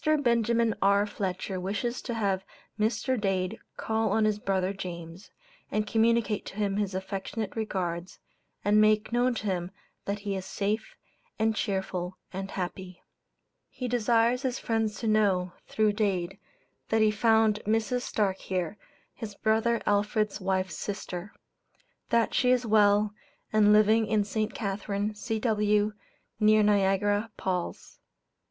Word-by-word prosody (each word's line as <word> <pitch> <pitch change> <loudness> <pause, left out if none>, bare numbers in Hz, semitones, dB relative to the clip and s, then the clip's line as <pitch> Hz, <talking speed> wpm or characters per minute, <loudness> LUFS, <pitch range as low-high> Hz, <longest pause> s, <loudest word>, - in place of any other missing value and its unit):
Benjamin 235 -6 +2
R. 200 +1 +4
Fletcher 190 -2 -3
wishes 205 +6 -2
to 235 - -4
have 195 -4 0 0.4
Mr. 235 +3 0
Dade 195 +1 -1 0.2
call 220 0 0
on 220 -1 +3
his 210 -1 +1
brother 190 -1 0
James, 175 -1 -8 0.4
and 215 0 0
communicate 225 -1 +2
to - - -8
him 200 -1 0
his 200 -2 -1
affectionate 195 +3 -4
regards, 185 -5 -3 0.5
and 210 +1 +5
make 215 0 +3
known 245 +1 +2
to 220 - -5
him 180 -3 -1 0.4
that 200 +1 -1
he 200 -1 -2
is 190 - -4
safe, 205 +3 -2 0.4
and 220 0 +1
cheerful 190 -4 -2 0.2
and 195 +1 -4
happy. 185 -1 -6 0.7
He 250 - -5
desires 235 +1 +2
his 260 -2 -1
friends 225 -2 -1
to 225 - -2
know, 195 -4 +2
through 215 -1 +2
Dade, 195 -3 -1 0.5
that 220 0 +3
he 215 - +4
found 220 0 +3
Mrs. 225 +3 +1
Starke 200 -5 0
here, 185 +2 -3 0.3
his 210 -3 -7
brother 225 +2 +1
Alfred's 210 +1 +1
wife's 185 -3 -1
sister; 195 -1 -5 0.8
that 235 -1 +2
she 250 - +3
is 250 -1 +3
well, 210 -1 +4 0.4
and 210 -1 +5
living 215 +1 +5
in 210 -1 +2
St. 215 +1 -2
Catharine, 205 0 -2
C.W., 210 -1 +1 0.5
near 215 0 +5
Niagara 205 +1 +2
Palls. 180 -2 -4
210 Hz, 135 wpm, -28 LUFS, 195-220 Hz, 0.8 s, and